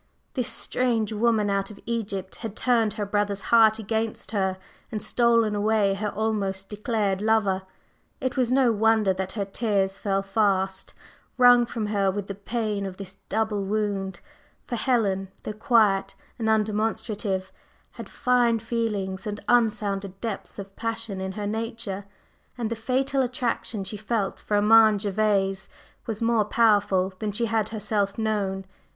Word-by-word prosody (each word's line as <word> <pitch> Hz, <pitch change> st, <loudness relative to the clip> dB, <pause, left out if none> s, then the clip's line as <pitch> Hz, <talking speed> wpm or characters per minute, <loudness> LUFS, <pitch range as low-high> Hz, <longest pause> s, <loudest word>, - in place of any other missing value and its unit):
This 250 Hz, -4 st, -1 dB
"strange 230 Hz, -1 st, 0 dB
woman 220 Hz, -1 st, +2 dB
out 195 Hz, 0 st, 0 dB
of 210 Hz, -, -11 dB
Egypt" 200 Hz, -5 st, -3 dB
had 220 Hz, -3 st, -6 dB
turned 230 Hz, -4 st, +2 dB
her 215 Hz, -1 st, -3 dB
brother's 200 Hz, -1 st, -1 dB
heart 220 Hz, -2 st, +7 dB
against 220 Hz, 0 st, -3 dB
her, 190 Hz, -3 st, 0 dB, 0.3 s
and 215 Hz, -, -2 dB
stolen 230 Hz, -1 st, +2 dB
away 205 Hz, -1 st, +2 dB
her 210 Hz, +2 st, -2 dB
almost 200 Hz, -3 st, -2 dB
declared 210 Hz, -2 st, -1 dB
lover. 210 Hz, -3 st, +2 dB, 0.6 s
It 260 Hz, -3 st, -2 dB
was 250 Hz, -2 st, +1 dB
no 255 Hz, -2 st, +4 dB
wonder 220 Hz, -2 st, +3 dB
that 190 Hz, 0 st, -4 dB
her 205 Hz, -3 st, -2 dB
tears 195 Hz, -2 st, -1 dB
fell 195 Hz, -1 st, 0 dB
fast, 195 Hz, -2 st, 0 dB, 0.4 s
wrung 245 Hz, -1 st, +7 dB
from 225 Hz, -2 st, -3 dB
her 200 Hz, -2 st, +1 dB
with 200 Hz, +1 st, -3 dB
the 200 Hz, -, -5 dB
pain 210 Hz, 0 st, -2 dB
of 185 Hz, -1 st, -8 dB
this 195 Hz, -1 st, -9 dB
double 215 Hz, -1 st, 0 dB
wound; 195 Hz, -2 st, -2 dB, 0.4 s
for 240 Hz, -, -3 dB
Helen, 205 Hz, -7 st, +1 dB
though 210 Hz, -, -4 dB
quiet 205 Hz, -3 st, +2 dB, 0.2 s
and 220 Hz, -1 st, 0 dB
undemonstrative, 215 Hz, -2 st, 0 dB, 0.4 s
had -, -, -9 dB
fine 245 Hz, -2 st, +2 dB
feelings 210 Hz, -4 st, -2 dB
and 205 Hz, 0 st, -3 dB
unsounded 205 Hz, -5 st, +1 dB
depths 225 Hz, -3 st, -5 dB
of 195 Hz, -1 st, -8 dB
passion 225 Hz, -3 st, -3 dB
in 190 Hz, 0 st, -3 dB
her 205 Hz, +1 st, -4 dB
nature, 220 Hz, -2 st, -3 dB, 0.5 s
and 230 Hz, -2 st, -2 dB
the -, -, 0 dB
fatal 260 Hz, +4 st, 0 dB
attraction 240 Hz, -4 st, -2 dB
she 210 Hz, +2 st, -6 dB
felt 215 Hz, -1 st, -2 dB
for 210 Hz, -, -2 dB
Armand 215 Hz, 0 st, +6 dB
Gervase 195 Hz, -2 st, 0 dB, 0.4 s
was 225 Hz, -1 st, -3 dB
more 225 Hz, -2 st, +3 dB
powerful 205 Hz, -4 st, +3 dB
than 215 Hz, -1 st, -2 dB
she 230 Hz, +4 st, -1 dB
had 220 Hz, -1 st, 0 dB
herself 210 Hz, -2 st, -1 dB
known. 200 Hz, -3 st, -1 dB
210 Hz, 150 wpm, -25 LUFS, 195-225 Hz, 0.6 s, heart